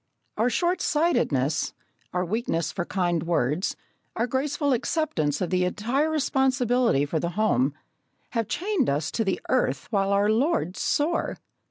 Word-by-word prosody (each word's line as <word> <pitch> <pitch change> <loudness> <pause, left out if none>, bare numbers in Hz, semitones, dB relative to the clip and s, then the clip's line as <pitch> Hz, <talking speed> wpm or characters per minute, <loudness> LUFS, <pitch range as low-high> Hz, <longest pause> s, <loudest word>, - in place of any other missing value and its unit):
Our 230 +3 +2
short 350 +7 0
sightedness, 160 - +1 0.4
our 180 0 -1
weakness 180 -4 -1
for 175 - -3
kind 175 -4 0
words, 165 - 0 0.4
our 230 - +1
graceful 280 +3 0
acceptance 225 - 0
of 180 - -1
the 185 0 +2
entire 235 +11 0
responsibility 255 - +2
for 155 +2 -1
the 170 - -1
home, 145 -10 +2 0.6
have 230 -3 -1
chained 365 - 0
us 145 +1 -1
to 225 - 0
the 195 -3 -1
earth, 135 +3 +1
while 195 -2 +1
our 200 +1 +3
lords 230 - 0
soar. 310 +4 0
215 Hz, 145 wpm, -26 LUFS, 170-270 Hz, 0.6 s, our